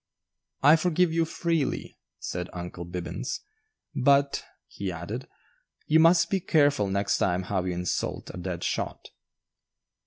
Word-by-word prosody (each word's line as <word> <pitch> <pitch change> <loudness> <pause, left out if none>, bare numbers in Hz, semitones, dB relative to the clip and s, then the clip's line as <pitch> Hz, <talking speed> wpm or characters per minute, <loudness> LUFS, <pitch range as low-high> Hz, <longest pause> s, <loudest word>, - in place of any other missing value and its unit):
"I 150 +4 +8
forgive 175 0 +2
you 165 0 +2
freely," 165 -3 -1 0.2
said 90 0 -4
"Uncle 90 0 -6
Bibbins"; 90 +8 -4 0.5
"but," 140 +1 +3 0.2
he 100 -2 -5
added, 95 +10 -6 0.6
"you 160 +1 +4
must 170 +1 +5
be 195 - +2
careful 145 - +3
next 100 +1 0
time 90 0 +1
how 95 -1 -1
you 90 - -1
insult 90 0 -2
a - - -7
dead 90 -1 -4
shot." - - -3
125 Hz, 130 wpm, -27 LUFS, -, 0.6 s, I